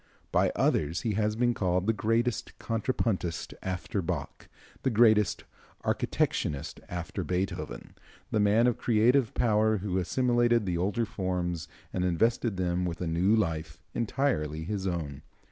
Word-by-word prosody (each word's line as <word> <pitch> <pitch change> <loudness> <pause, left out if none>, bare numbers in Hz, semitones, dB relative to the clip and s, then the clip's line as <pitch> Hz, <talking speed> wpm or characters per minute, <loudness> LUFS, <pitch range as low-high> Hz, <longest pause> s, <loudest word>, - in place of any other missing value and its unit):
By - - +3
others 80 +3 +1
he 110 - -1
has 105 +1 +1
been 120 +1 +2
called 90 -3 0
the 115 - +3
greatest 115 +3 0
contrapuntist 110 -6 -1
after 95 +1 -2
Bach, 85 -5 -4 0.3
the 130 - +1
greatest 110 -3 +4 0.4
architectonist 75 +1 -1
after 85 -2 -4
Beethoven, 90 -9 -3 0.4
the 110 - +2
man 105 +3 +4
of 125 -2 +1
creative 120 +2 +3
power 110 -1 +3
who 95 -1 -1
assimilated 120 +3 +2
the 90 -2 -1
older 100 +6 0
forms 90 -4 -2 0.3
and 90 - 0
invested 105 +4 +1
them 90 0 0
with 85 -2 -3
a 90 - -2
new 85 +6 +3
life 80 -6 -1
entirely 105 - 0
his 95 +2 -3
own. 75 -6 -3
95 Hz, 140 wpm, -29 LUFS, 85-115 Hz, 0.4 s, greatest